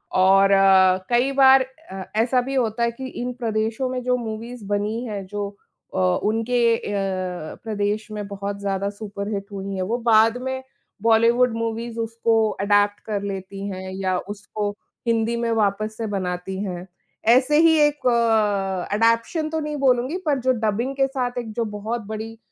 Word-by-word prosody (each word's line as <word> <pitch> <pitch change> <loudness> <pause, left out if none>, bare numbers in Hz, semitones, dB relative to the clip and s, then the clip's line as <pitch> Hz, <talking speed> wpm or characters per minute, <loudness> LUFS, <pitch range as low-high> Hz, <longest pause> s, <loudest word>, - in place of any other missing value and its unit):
और 195 +1 +5
अ, 190 -1 +6
कई 245 +3 +2
बार 270 -1 +6 0.3
अ, 190 0 -5
ऐसा 240 +3 +2
भी 270 +2 -4
होता 235 -2 0
है 235 - +2
कि 260 +3 -7
इन 250 +1 -3
प्रदेशों 225 +1 -1
में 255 0 -3
जो 250 0 +2
मूवीज़ 230 0 -6
बनी 205 +3 -1
हैं 205 -4 -5
जो 205 +1 -4 0.5
अ, - - -2 0.3
उनके 230 +2 +2
अ, - - -9 0.8
प्रदेश 215 0 -2
में 210 -1 -5
बहुत 200 0 -5
ज़्यादा 200 0 -1
सुपरहिट 200 -1 -5
हुई 195 0 -5
है 190 - -2
वो 240 - +1
बाद 225 +2 +5
में 260 0 -3 0.4
बॉलीवुड 230 +2 +4
मूवीज़ 230 0 -3
उसको 230 0 0 0.3
एडैप्ट 205 0 +3
कर 210 -2 -2
लेती 195 0 -5
हैं 190 -1 -6
या 190 -1 0
उसको 205 +1 -5 0.4
हिंदी 230 0 +1
में 235 0 -1
वापस 215 0 0
से 225 - -3
बनाती 190 -2 -3
हैं। 180 -2 -5 0.5
ऐसे 265 +4 +4
ही 325 -1 +5
एक 295 -3 +2
अ, 210 -5 +1
एडॉप्शन 230 - +1
तो 320 0 -2
नहीं 300 -1 -3
बोलूँगी 260 +3 +2
पर 290 -3 +1
जो 260 +1 +2
डबिंग 235 +6 -1
के 270 0 +2
साथ 255 -2 -3
एक 230 -2 -6
जो 230 +1 -1
बहुत 225 +3 -3
बड़ी 220 +1 -6
220 Hz, 170 wpm, -23 LUFS, 200-245 Hz, 0.8 s, अ